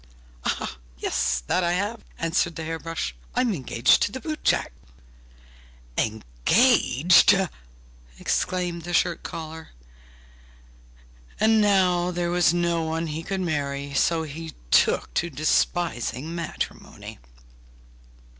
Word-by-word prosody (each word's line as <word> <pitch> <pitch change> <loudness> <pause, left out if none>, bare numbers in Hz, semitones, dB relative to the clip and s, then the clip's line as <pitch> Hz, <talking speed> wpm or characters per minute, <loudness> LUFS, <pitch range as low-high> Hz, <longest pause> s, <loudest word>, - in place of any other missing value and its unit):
'Yes, 60 0 0
that 185 - +1
I 170 0 +1
have!' 205 +5 -2
answered 165 +1 0
the 165 - -5
hair 165 +1 -4
brush; 165 - -4 0.2
'I'm 245 -4 +2
engaged 130 -7 +2
to - - +1
the 260 - -5
boot 310 +1 -5
jack!' - - +2 1.2
'Engaged!' 125 - +4 0.8
exclaimed 175 -2 -1
the 175 +1 -3
shirt 175 -2 +1
collar. 160 0 -8 1.7
And 220 +1 +4
now 185 -4 +3
there 175 -1 -2
was 175 -2 +4
no 170 -1 +1
one 160 +1 -2
he 155 0 -4
could 190 +3 -3
marry, 140 -4 -2
so 165 +3 +2
he 160 +1 -8 0.2
took - - +3
to 170 - 0
despising 155 -3 0
matrimony. 170 - -6
165 Hz, 110 wpm, -25 LUFS, 155-180 Hz, 1.7 s, Engaged